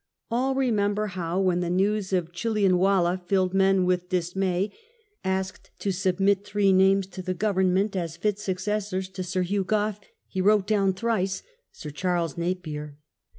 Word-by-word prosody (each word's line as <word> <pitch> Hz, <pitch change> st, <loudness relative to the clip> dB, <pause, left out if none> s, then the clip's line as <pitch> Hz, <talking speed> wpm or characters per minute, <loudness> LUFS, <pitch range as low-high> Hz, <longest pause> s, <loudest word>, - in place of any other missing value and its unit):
All 260 Hz, +3 st, +1 dB
remember 215 Hz, -5 st, +1 dB
how, 180 Hz, -3 st, -3 dB
when 185 Hz, -2 st, +2 dB
the 175 Hz, -1 st, -1 dB
news 195 Hz, +2 st, +1 dB
of 175 Hz, -3 st, 0 dB
Chillianwallah 185 Hz, -2 st, +2 dB
filled 185 Hz, -1 st, +2 dB
men 195 Hz, -1 st, +3 dB
with 180 Hz, 0 st, 0 dB
dismay, 185 Hz, +2 st, 0 dB, 0.5 s
asked 190 Hz, 0 st, -3 dB
to 200 Hz, -, -1 dB
submit 195 Hz, +1 st, +1 dB
three 205 Hz, -2 st, +2 dB
names 190 Hz, +1 st, +4 dB
to 185 Hz, 0 st, -8 dB
the 185 Hz, 0 st, -3 dB
Government 195 Hz, 0 st, +1 dB
as 165 Hz, -3 st, -3 dB
fit 210 Hz, +3 st, -1 dB
suc 190 Hz, -3 st, -2 dB
cessors 190 Hz, -1 st, -2 dB
to 185 Hz, -, -5 dB
Sir 185 Hz, 0 st, -1 dB
Hugh 195 Hz, +2 st, 0 dB
Gough, 210 Hz, +1 st, 0 dB, 0.3 s
he 190 Hz, -, -3 dB
wrote 205 Hz, 0 st, +4 dB
down 200 Hz, -2 st, +2 dB
thrice, 195 Hz, -2 st, -1 dB, 0.2 s
" -, -, -51 dB
Sir 150 Hz, -, -8 dB
Charles 170 Hz, -1 st, -1 dB
Napier." 155 Hz, -4 st, -4 dB
190 Hz, 160 wpm, -26 LUFS, 180-205 Hz, 0.5 s, names